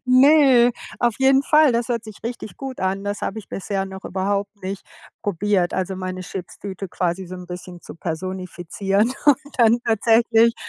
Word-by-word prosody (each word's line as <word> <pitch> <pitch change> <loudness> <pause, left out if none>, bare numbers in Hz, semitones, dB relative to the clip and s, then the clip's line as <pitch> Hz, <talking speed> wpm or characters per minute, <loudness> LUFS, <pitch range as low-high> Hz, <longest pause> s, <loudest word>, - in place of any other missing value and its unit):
Ne, 255 -1 +6 0.3
auf 240 -2 +2
jeden 265 0 +4
Fall, 305 -1 +5
das 235 0 0
hört 235 -2 -1
sich 215 -2 -10
richtig 235 -2 -6
gut 265 -2 -7
an. 190 +1 -1
Das 205 0 -3
habe 210 - -3
ich 215 - -11
bisher 195 0 -3
noch 190 0 -9
überhaupt 200 +1 -1
nicht 190 +1 -5 0.4
probiert. 195 -1 0
Also 190 0 -2
meine 185 0 -4
Chipstüte 190 +1 -7
quasi 180 +1 -2
so 180 - -8
'n 180 -1 -9
bisschen 180 0 -8
zu - - -11
personifizieren 185 +5 -2
und 290 -3 +7 0.2
dann 230 0 +5
tatsächlich 230 +1 +4
200 Hz, 170 wpm, -22 LUFS, 185-235 Hz, 0.4 s, und